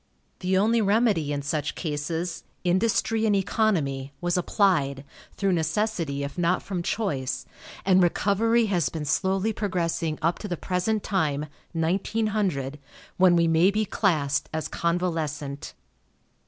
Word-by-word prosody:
The 185 0 +1
only 225 +4 +3
remedy 205 -7 +2
in 145 -1 -2
such 150 0 -2
cases 165 +2 -3 0.2
industry 220 +4 +2
and 205 - +3
economy 160 -10 0
was 175 -1 0
applied, 165 -7 +1 0.3
through 195 -1 0
necessity 165 -3 -1
if 140 +5 -5
not 175 +1 +1
from 185 -3 -3
choice, 145 - -2 0.4
and 190 -1 +5
recovery 220 +6 +2
has 175 - +1
been 155 +1 -5
slowly 190 +7 +1
progressing 170 -6 -1
up 165 +2 0
to 210 - -5
the 175 -3 -3
present 190 +5 -1
time 150 -7 0 0.3
(1900), 180 -4 -1 0.4
when 185 -1 +6
we 170 -1 +3
may 165 +3 +4
be 215 +2 0
classed 155 -9 0
as 160 0 -2
convalescent. 160 -5 -2
175 Hz, 130 wpm, -26 LUFS, 150-200 Hz, 0.4 s, when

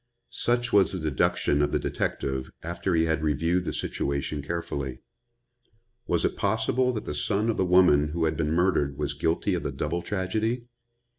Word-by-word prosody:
Such 120 0 0
was 100 -2 +5
the 95 - -3
deduction 75 -1 +1
of 75 0 +1
the - - +2
detective 65 -1 -2
after 85 +2 -1
he 80 0 +3
had 80 -1 0
reviewed 80 +4 +1
the - - -1
situation 70 +1 -2
carefully. 70 -4 -4 1.1
Was 85 -1 +1
it - - 0
possible 110 +5 +1
that 110 -2 -4
the - - -3
son 105 +9 0
of - - -5
the - - +2
woman 90 -5 +5
who 80 +2 -1
had 80 0 0
been 75 -1 -1
murdered 80 -5 +1
was 75 -1 -2
guilty 80 +1 0
of - - -1
the - - -3
double 85 +3 -2
tragedy? 110 +6 -1
85 Hz, 175 wpm, -27 LUFS, 75-95 Hz, 1.1 s, was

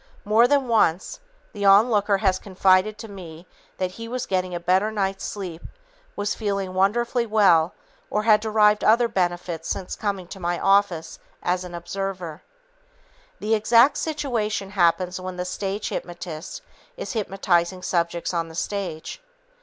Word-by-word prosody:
More 220 +3 +5
than 280 -1 +2
once, 200 - +1 0.3
the 205 - -5
onlooker 205 0 +5
has 190 -2 +1
confided 190 +2 +2
to 225 - -8
me 175 -4 -10 0.3
that 185 -1 -2
he 230 +4 -8
was 250 +1 -3
getting 185 -4 -1
a - - -2
better 185 +5 +2
night's 195 -2 -2
sleep, 180 -5 -6 0.5
was 205 +1 -1
feeling 200 -3 -3
wonderfully 235 +5 +1
well 190 -6 +4 0.3
or 210 - 0
had 215 -1 +5
derived 210 -1 +3
other 235 +2 +4
benefits 175 -4 -2
since 185 - -3
coming 200 -3 -3
to 195 - -9
my 175 0 -1
office 195 -4 +1 0.2
as 180 +1 0
an 175 -1 -8
"observer." 175 -1 -5 1.0
The 215 +1 0
exact 230 +5 +5
situation 230 -10 -2
happens 180 -1 +1
when 185 0 -6
the 180 - -3
stage 195 +3 -3
hypnotist 175 -2 -6 0.3
is - - -5
hypnotizing 190 -4 0
subjects 170 0 -1
on 165 -1 -1
the 160 - -11
stage. 180 - -4
195 Hz, 145 wpm, -24 LUFS, 180-215 Hz, 1.0 s, More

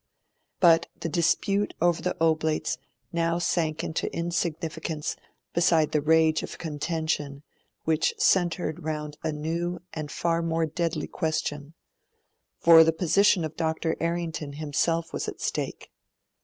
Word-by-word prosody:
But 170 -2 +5
the 165 - -3
dispute 195 +5 +1
over 175 0 +2
the 180 - -2
Oblates 160 -1 +1 0.3
now 170 0 +1
sank 165 -3 0
into 160 - -2
insignificance 165 -2 -2 0.4
beside 165 -2 +3
the 150 - +2
rage 160 +1 +4
of - - -7
contention 150 -2 -3 0.4
which 160 -1 +1
centred 175 -2 +1
round 150 -1 -4
a 155 - -1
new 170 +4 -2
and 155 -2 -5
far 170 0 0
more 165 0 0
deadly 160 0 -2
question; 155 -1 -3 0.8
for 165 -1 +8
the 160 - +3
position 180 +1 +3
of 155 0 -7
Dr. 160 0 -1
Errington 165 -3 -2
himself 160 +3 -1
was - - -3
at - - -6
stake. - - -3
160 Hz, 130 wpm, -26 LUFS, 155-170 Hz, 0.8 s, for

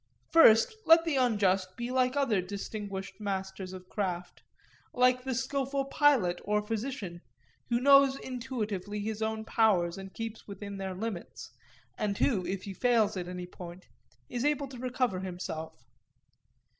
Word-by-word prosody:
First, 315 - +7
let 330 0 +7
the 325 -4 0
unjust 195 -7 +2
be 240 +1 -3
like 255 0 +2
other 240 -9 +2
distinguished 195 0 -6
masters 190 -2 -4
of 185 -1 -10
craft; 180 -4 -4 0.5
like 250 0 +4
the 260 -1 -2
skilful 275 +2 -1
pilot 270 - +3
or 210 0 0
physician, 215 -6 -4 0.5
who 235 0 +2
knows 275 0 +6
intuitively 215 -7 -4
his 220 +1 -4
own 220 0 -2
powers 195 -6 +2
and 195 0 -8
keeps 225 +1 -6
within 200 0 -7
their 190 -1 -4
limits, 200 -2 -6 0.5
and 205 -2 -1
who, 205 -9 +2
if 190 -1 -3
he 200 - -6
fails 230 -1 +2
at 180 -2 -4
any 180 0 -5
point, 180 0 -10 0.4
is 245 - -3
able 290 -1 +1
to 255 -2 -9
recover 250 -5 -1
himself. 160 -6 -6
210 Hz, 145 wpm, -30 LUFS, 190-255 Hz, 0.5 s, First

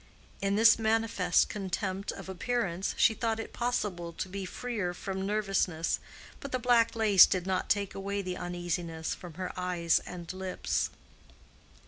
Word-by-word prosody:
In 195 0 +1
this 225 +2 +6
manifest 220 -5 +2
contempt 195 0 -3
of - - -9
appearance, 190 -1 -2
she 225 - +5
thought 225 -1 -1
it 225 - -6
possible 205 -8 -2
to 175 - -4
be 195 +1 -5
freer 205 -4 -3
from 190 +1 -4
nervousness, 195 -6 0 0.4
but 280 - -7
the 255 - +1
black 235 -2 +3
lace 210 -4 +7
did 185 -2 -1
not 185 -1 -1
take 200 -1 +1
away 200 +1 -3
the 180 -1 -3
uneasiness 175 -2 -3
from 175 -4 -10
her 185 +1 -4
eyes 180 -2 +1
and 175 -1 -7
lips. 185 -1 -1
190 Hz, 150 wpm, -30 LUFS, 180-220 Hz, 0.4 s, lace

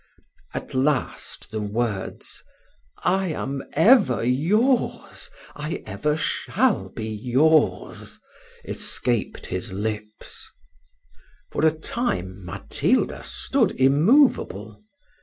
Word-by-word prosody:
At - - -5
last 135 -5 -1
the 110 -1 -3
words, 105 -1 -3 0.6
"I 190 +1 +2
am 140 -4 -3
ever 160 - +5
yours, 210 - +1 0.3
I 150 +2 -4
ever 110 +10 -1
shall - - 0
be 110 - -6
yours," 130 +8 +1 0.5
escaped 120 -3 -2
his 90 +1 -4
lips. 105 +1 -5 1.0
For - - -2
a - - +5
time 100 - -3
Matilda 85 -1 0
stood - - 0
immoveable. 135 - +3
130 Hz, 85 wpm, -24 LUFS, 105-160 Hz, 1.0 s, ever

